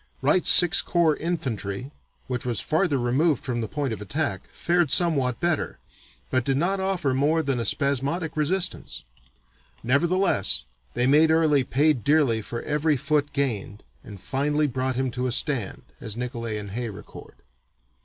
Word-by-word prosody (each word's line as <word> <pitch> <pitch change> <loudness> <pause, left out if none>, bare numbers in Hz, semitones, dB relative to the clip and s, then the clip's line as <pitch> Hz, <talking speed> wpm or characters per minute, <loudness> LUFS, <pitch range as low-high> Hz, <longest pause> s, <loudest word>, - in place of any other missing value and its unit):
Wright's 150 +6 +4
(Sixth 175 +1 +7
Corps) 170 -4 +2
infantry, 130 - -4 0.3
which 125 -2 -4
was 120 -3 -2
farther 160 -2 0
removed 130 +5 0
from 120 -3 -2
the 110 - -3
point 140 -1 -3
of 105 - -7
attack, 105 -3 -3
fared 175 -3 0
somewhat 135 -7 +2
better, 170 -3 -1 0.5
but 130 -1 +1
did 135 +1 0
not 190 +6 0
offer 185 -8 -1
more 150 +5 +1
than 135 -4 -1
a 115 - -2
spasmodic 140 +4 0
resistance." 175 - -1 0.8
Nevertheless, 155 - +1 0.3
they 125 - +2
made 150 +4 +4
Early 155 -4 +3
"pay 145 +5 +2
dearly 135 -3 +1
for 115 +2 -6
every 150 0 0
foot 145 +2 0
gained 110 -7 -3 0.2
and 100 -2 -11
finally 145 +8 -1
brought 130 -1 -2
him 130 0 -1
to 125 +1 -3
a - - -2
stand," 120 -6 -1 0.2
as 110 +1 -6
Nicolay 120 -3 -4
and 100 -1 -7
Hay 120 +2 -4
record. 100 - -12
140 Hz, 155 wpm, -24 LUFS, 120-160 Hz, 0.8 s, Sixth